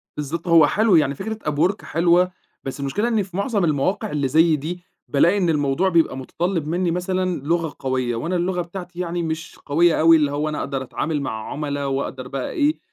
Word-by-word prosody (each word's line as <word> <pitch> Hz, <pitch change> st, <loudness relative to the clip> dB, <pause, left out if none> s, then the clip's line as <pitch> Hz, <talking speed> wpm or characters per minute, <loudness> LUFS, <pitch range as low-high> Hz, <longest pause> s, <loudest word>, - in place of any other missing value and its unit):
بالضبط، 155 Hz, +4 st, -4 dB
هو 165 Hz, -3 st, +6 dB
حلو 215 Hz, 0 st, +3 dB
يعني 145 Hz, -3 st, +3 dB
فكرة 220 Hz, +9 st, -5 dB
Upwork 175 Hz, +8 st, +1 dB
حلوة، 175 Hz, +2 st, +2 dB, 0.3 s
بس 135 Hz, +1 st, -6 dB
المشكلة 140 Hz, -, -1 dB
إني 220 Hz, -4 st, +1 dB
في 185 Hz, 0 st, -8 dB
معظم 200 Hz, -2 st, +1 dB
المواقع 175 Hz, +8 st, 0 dB
اللي 145 Hz, -2 st, 0 dB
زي 160 Hz, +3 st, +4 dB
دي، 175 Hz, +5 st, -5 dB, 0.2 s
بالاقي 170 Hz, +8 st, +3 dB
إن 180 Hz, -4 st, +1 dB
الموضوع 150 Hz, +4 st, +1 dB
بيبقى 165 Hz, -6 st, +2 dB
متطلِّب 165 Hz, +4 st, -2 dB
مني 175 Hz, +2 st, 0 dB
مثلًا 180 Hz, -1 st, -1 dB
لغة 165 Hz, 0 st, -1 dB
قوية، 130 Hz, -3 st, -1 dB
وأنا 165 Hz, +10 st, -2 dB
اللغة 180 Hz, +1 st, 0 dB
بتاعتي 175 Hz, 0 st, -8 dB
يعني 175 Hz, -1 st, -2 dB
مش 160 Hz, +1 st, -5 dB
قوية 165 Hz, +3 st, +3 dB
أوي 165 Hz, +1 st, +7 dB
اللي 145 Hz, -2 st, +1 dB
هو 150 Hz, +2 st, -1 dB
أنا 150 Hz, -, -3 dB
أقدر 135 Hz, -1 st, -3 dB
أتعامل 150 Hz, +3 st, -2 dB
مع 110 Hz, -5 st, -5 dB
عُملا، 145 Hz, -1 st, -3 dB
وأقدر 135 Hz, -1 st, -3 dB
بقى 135 Hz, 0 st, -4 dB
إيه 300 Hz, +1 st, +1 dB
165 Hz, 195 wpm, -22 LUFS, 145-180 Hz, 0.3 s, أوي